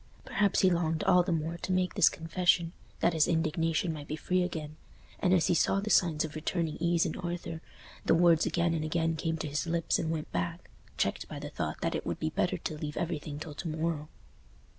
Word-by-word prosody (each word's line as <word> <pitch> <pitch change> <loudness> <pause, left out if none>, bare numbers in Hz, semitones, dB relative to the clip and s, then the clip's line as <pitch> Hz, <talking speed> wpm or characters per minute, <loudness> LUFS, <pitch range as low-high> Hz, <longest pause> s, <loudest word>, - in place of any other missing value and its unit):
Perhaps 200 -2 +2
he 185 - +5
longed 165 -2 0
all 180 -1 +5
the 175 - -2
more 165 +1 -1
to 185 - -4
make 185 0 +1
this - - +6
confession, 165 +1 +1 0.3
that 170 - +3
his 160 -2 +3
indignation 165 +1 +1
might 150 -2 -8
be 155 - -3
free 180 +4 0
again; 155 -4 -4 0.4
and 180 - +2
as 180 -3 +4
he - - +3
saw 195 +3 +2
the 210 +2 -2
signs 160 -4 +3
of 155 - -7
returning 160 0 -2
ease 170 0 +2
in - - -2
Arthur, 170 -2 -4 0.5
the - - +5
words 170 -1 +5
again 170 -1 +1
and 160 -2 -1
again 165 +1 0
came 160 +1 -2
to 155 - -4
his 150 +4 -2
lips 165 0 +1
and 160 - -1
went 160 -2 -3
back, 90 -1 -3 0.3
checked - - -1
by - - -7
the - - -6
thought - - -4
that - - 0
it - - -2
would - - -3
be - - -1
better - - 0
to 155 - -5
leave 150 -1 -5
everything 155 -4 -3
till 155 0 -7
to 165 - -6
morrow. 155 -1 -2
165 Hz, 225 wpm, -30 LUFS, 155-175 Hz, 0.5 s, this